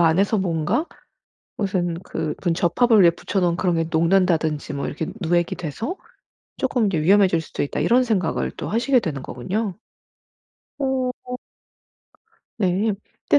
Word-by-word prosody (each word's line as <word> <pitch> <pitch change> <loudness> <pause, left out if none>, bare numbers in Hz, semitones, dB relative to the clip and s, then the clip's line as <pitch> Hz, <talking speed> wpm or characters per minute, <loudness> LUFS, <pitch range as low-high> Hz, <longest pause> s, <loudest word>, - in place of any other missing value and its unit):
안에서 185 +6 +3
뭔가 175 - 0 0.7
무슨 185 -4 -1
그 160 -4 -3
'분 170 -3 +1
접합을 215 +5 +4
위에 170 - +7
붙여놓은 175 0 -1
그런 175 -1 +1
게 165 - +1
녹는다든지 165 -2 +2
뭐 140 - -2
이렇게 155 +2 -4
누액이 175 -1 +1
돼서 200 - -4 0.6
쪼끔 250 -4 +1
이게 175 -6 0
위험해질 190 -1 +4
수도 160 - -4
있다.' 145 - -2
이런 245 +2 +4
생각을 195 -8 0
또 - - -6
하시게 240 +4 +2
되는 145 - -4
거군요. 195 - -3 1.0
오. 265 -2 0 1.5
네. 200 +1 +1 0.4
근데 145 - +6
180 Hz, 290 characters per minute, -22 LUFS, 165-215 Hz, 1.5 s, 위에